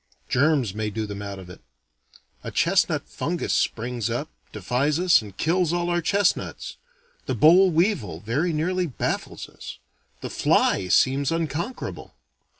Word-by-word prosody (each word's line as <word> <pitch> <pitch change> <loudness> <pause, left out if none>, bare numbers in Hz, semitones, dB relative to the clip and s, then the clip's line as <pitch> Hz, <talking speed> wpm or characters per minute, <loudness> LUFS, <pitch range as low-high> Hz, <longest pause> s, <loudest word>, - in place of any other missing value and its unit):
Germs 135 -6 +2
may 110 0 -2
do 110 +1 -3
them 100 -1 -7
out 100 -1 -6
of 95 -1 -10
it. 90 - -12 0.8
A - - -5
chestnut - - +1
fungus - - -3
springs 120 -1 -1
up, 120 +7 -3 0.2
defies 125 - -1
us, 180 -6 +5
and 100 -3 -12
kills 175 +1 +1
all 175 0 0
our 175 0 +1
chestnuts. 200 +3 -1 0.5
The - - -1
boll 180 +5 +6
weevil 160 - 0
very 135 - -1
nearly 180 +3 -1
baffles 135 - -4
us. - - -10 0.4
The - - -6
fly 95 - +2
seems 135 - +2
unconquerable. 165 - -4
145 Hz, 145 wpm, -24 LUFS, 110-175 Hz, 0.8 s, boll